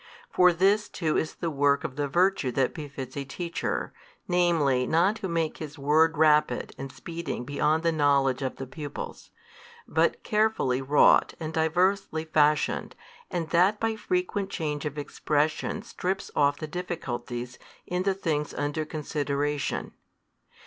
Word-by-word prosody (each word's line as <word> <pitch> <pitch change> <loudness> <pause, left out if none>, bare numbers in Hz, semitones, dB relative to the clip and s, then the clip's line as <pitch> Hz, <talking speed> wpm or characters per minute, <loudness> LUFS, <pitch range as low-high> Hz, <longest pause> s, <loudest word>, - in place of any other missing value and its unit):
For 180 0 +6
this 195 +5 +2
too 160 -3 -1
is 155 - -1
the 165 -2 -3
work 140 -1 +2
of 145 -4 -5
the 145 0 -1
virtue 175 -3 +2
that 130 0 +1
befits 140 -4 -7
a 140 - -3
teacher, 170 +5 -3 0.3
namely 165 -8 +2
not 180 +7 +3
to 195 - -4
make 165 -2 -1
his 155 -1 -7
word 155 +3 +3
rapid 150 -5 +3
and 135 0 -6
speeding 170 -7 -5
beyond 150 +4 +1
the 165 - +3
knowledge 140 -4 +2
of 130 -1 -2
the 135 - -6
pupils, 145 +2 -7 0.6
but - - +1
carefully 210 - +1
wrought 140 +2 +4
and 160 -1 -5
diversely 160 +1 +1
fashioned 150 -1 +1 0.3
and 165 -2 -3
that 185 +5 +4
by 225 -1 0
frequent 220 - -1
change 150 -5 -3
of 150 0 -4
expression 150 +6 -1
strips 190 -3 -3
off 145 0 +3
the 155 - -5
difficulties 125 -8 -5 0.3
in 180 0 -2
the 190 0 +1
things 155 -6 -2
under 145 +2 -2
consideration. 145 -2 -2
155 Hz, 145 wpm, -27 LUFS, 145-175 Hz, 0.6 s, For